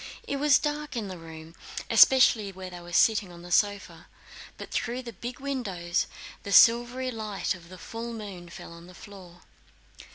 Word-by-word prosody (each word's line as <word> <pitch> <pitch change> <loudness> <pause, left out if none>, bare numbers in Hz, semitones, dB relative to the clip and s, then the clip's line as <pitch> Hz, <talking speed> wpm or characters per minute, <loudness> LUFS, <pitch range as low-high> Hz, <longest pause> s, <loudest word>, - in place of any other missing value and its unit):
It 280 - -2
was 290 0 +5
dark 295 -1 -3
in 215 -4 -3
the 185 - -7
room 160 0 -11 0.3
especially 230 -6 +5
where 185 -1 -9
they 175 - -8
were 175 0 -12
sitting 205 +1 +3
on 170 0 -13
the 175 - -11
sofa, 205 +1 0 0.5
but - - -9
through 245 +2 -2
the 235 -2 -8
big 240 +7 -7
windows 200 -11 -2 0.3
the 200 - -7
silvery 240 +4 +5
light 215 -4 -3
of 170 -2 -14
the 185 - -11
full 230 +6 -7
moon 200 -6 -8
fell 170 - -10
on 170 +1 -13
the 180 - -14
floor. 180 -4 -13
200 Hz, 175 wpm, -27 LUFS, 175-240 Hz, 0.5 s, was